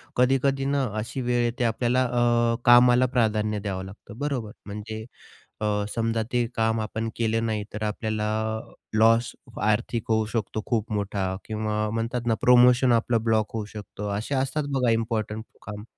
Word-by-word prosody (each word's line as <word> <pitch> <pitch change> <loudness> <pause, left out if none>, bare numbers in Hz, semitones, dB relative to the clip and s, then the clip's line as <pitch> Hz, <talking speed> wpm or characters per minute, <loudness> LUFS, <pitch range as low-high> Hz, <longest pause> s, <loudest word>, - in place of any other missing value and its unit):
कधी-कधी 135 +2 +2
ना, 140 0 +1 0.2
अशी 120 +4 -4
वेळ 120 -1 +1
येते 120 +1 -1
आपल्याला, 120 +2 +1
अ, 120 -1 +2
कामाला 120 +1 +7
प्राधान्य 110 -2 +1
द्यावं 95 -2 -4
लागतं, 105 +3 -12
बरोबर? 135 -7 -2
म्हणजे 105 +2 -6 0.6
अ, - - 0 0.3
समजा 115 -1 0
ते 120 -1 +2
काम 110 0 +1
आपण 110 +1 -3
केलं 115 0 0
नाही, 110 -2 -1
तर 105 +1 -4
आपल्याला 110 0 -2 0.7
लॉस 115 +2 +4 0.3
आर्थिक 110 +2 0
होऊ 110 0 +2
शकतो 110 -1 -2
खूप 115 -2 -1
मोठा 100 -1 -1 0.2
किंवा 110 0 -2
म्हणतात 115 +2 -2
ना, 115 - +3
प्रोमोशन 125 +1 +6
आपलं 115 0 +1
ब्लॉक 110 -2 +1
होऊ 110 - -2
शकतं, 105 -1 -6
असे 115 +7 -3
असतात 135 +3 0
बघा, 125 -3 +2
इम्पॉर्टंट 110 -1 -1 0.2
काम. 105 -1 -7
115 Hz, 155 wpm, -25 LUFS, 110-120 Hz, 0.7 s, कामाला